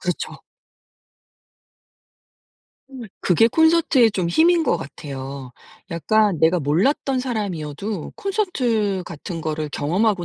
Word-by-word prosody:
그렇죠. 180 -1 -4 2.5
음. 260 -2 -9 0.2
그게 195 +6 +4
콘서트의 320 -5 +4
좀 185 -4 -1
힘인 335 - +4
것 245 - +1
같아요. 135 -3 -8 0.4
약간 195 +3 +2
내가 165 +3 +3
몰랐던 210 - +1
사람이어도 200 - -4
콘서트 250 - -1
같은 170 +1 -7
거를 155 -1 -3
경험하고 185 +6 0
195 Hz, 235 characters per minute, -21 LUFS, 160-250 Hz, 2.5 s, 그게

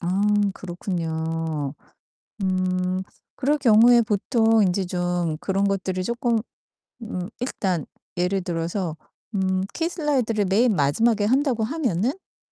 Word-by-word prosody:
아 180 +3 0 0.3
그렇군요. 165 -5 -3 0.7
음. 185 0 0 0.4
그럴 290 +3 +2
경우에 240 -1 +6
보통 225 +1 +2
인제 185 0 +1
좀 175 -2 -1
그런 195 +3 0
것들을 185 -1 -1
쪼끔 235 +3 0 0.7
음 180 -3 -5
일단 190 - -2 0.3
예를 180 +2 +1
들어서 170 0 -2 0.4
음 190 -1 +1
키 330 0 -1
슬라이드를 260 - 0
맨 215 +4 +3
마지막에 205 +9 +2
한다고 255 0 +2
하면은 240 - 0
음 380 +6 -20
195 Hz, 240 characters per minute, -24 LUFS, 175-235 Hz, 0.7 s, 경우에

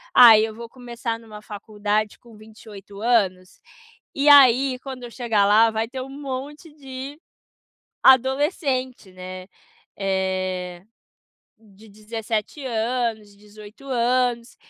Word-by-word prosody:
ah, 230 -3 +9
eu 220 0 -2
vou 235 +1 -9
começar 235 -2 -6
numa 215 -2 -12
faculdade 210 0 -3
com 235 -3 -18
28 210 -2 -13
anos, 195 -6 0 0.5
e 285 +1 +1
aí 265 -2 +6
quando 265 -2 -8
eu 240 - -8
chegar 225 -5 0
lá 220 +2 +5
vai 220 +1 -2
ter 260 +1 -6
monte 280 +3 -7
de 270 0 -9 0.8
adolescente, 265 - +2
né, 185 +1 -9 0.5
eh, 185 -2 -3 0.7
de 215 0 -19
17 215 +5 -5
anos, 225 -3 -3
18 210 +4 -15
anos, 245 -1 0
225 Hz, 110 wpm, -22 LUFS, 205-255 Hz, 0.8 s, ah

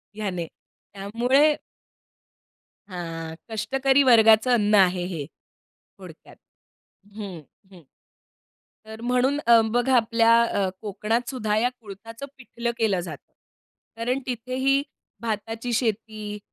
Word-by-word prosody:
हयाने. 185 -6 -3 0.5
त्यामुळे 245 +9 +2 1.3
हां. 165 -2 -6
कष्टकरी 270 +5 +2
वर्गाचं 225 -1 +6
अन्न 210 -3 +3
आहे 185 -2 +4
हे 165 -6 -5 0.5
थोडक्यात. - - -16 0.8
हं, 195 -5 -7 0.3
हं, 180 -2 -15 1.0
तर 220 +1 -10
म्हणून 250 +3 +1
अ, 235 -1 +7
बघा, 245 +2 +2
आपल्या 230 0 +4
अ, 200 -4 0
कोकणातसुद्धा 220 +1 -2
या 245 +3 +2
कुळथाचं 225 +5 -10
पिठलं 235 -2 -4
केलं 205 -5 +1
जातं, 175 - -10 0.6
कारण 250 +4 -1
तिथेही 260 +3 0 0.4
भाताची 225 +1 -4
शेती 215 -2 -2
225 Hz, 100 wpm, -24 LUFS, 205-245 Hz, 1.3 s, अ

